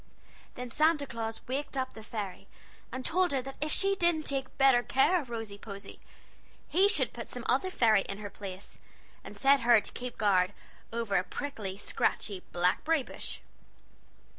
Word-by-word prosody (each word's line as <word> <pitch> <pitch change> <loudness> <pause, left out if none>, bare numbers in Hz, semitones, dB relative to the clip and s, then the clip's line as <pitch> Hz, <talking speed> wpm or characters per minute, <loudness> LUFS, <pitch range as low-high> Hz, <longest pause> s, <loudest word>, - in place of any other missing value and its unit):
Then 250 -1 -6
Santa 305 +1 +3
Claus 225 -3 -5
waked 275 +2 -3
up 260 -1 -2
the 220 - -10
fairy, 200 -3 -6 0.4
and 260 +1 -5
told 360 +1 +2
her 270 -2 +1
that 270 +1 -8
if 300 0 0
she 390 +4 +4
didn't 340 -4 +2
take 270 -2 -3
better 270 -3 +6
care 270 +9 +3
of 260 - -12
Rosy 225 -3 -5
Posy 200 -1 -9 0.7
he 385 +4 +4
should 415 - +3
put - - -7
some - - -6
other 375 - +2
fairy 225 - +4
into 200 +1 -5
her 205 - -6
place, 195 -1 -8 0.4
and - - -10
set 275 +1 +5
her 240 -3 +6
to - - -9
keep 250 0 -6
guard 195 -2 +3 0.4
over 225 -4 0
a 180 - +2
prickly, 210 -7 -5
scratchy, 200 -1 -1
blackberry 195 - +2
bush." - - -6
245 Hz, 170 wpm, -30 LUFS, 205-285 Hz, 0.7 s, better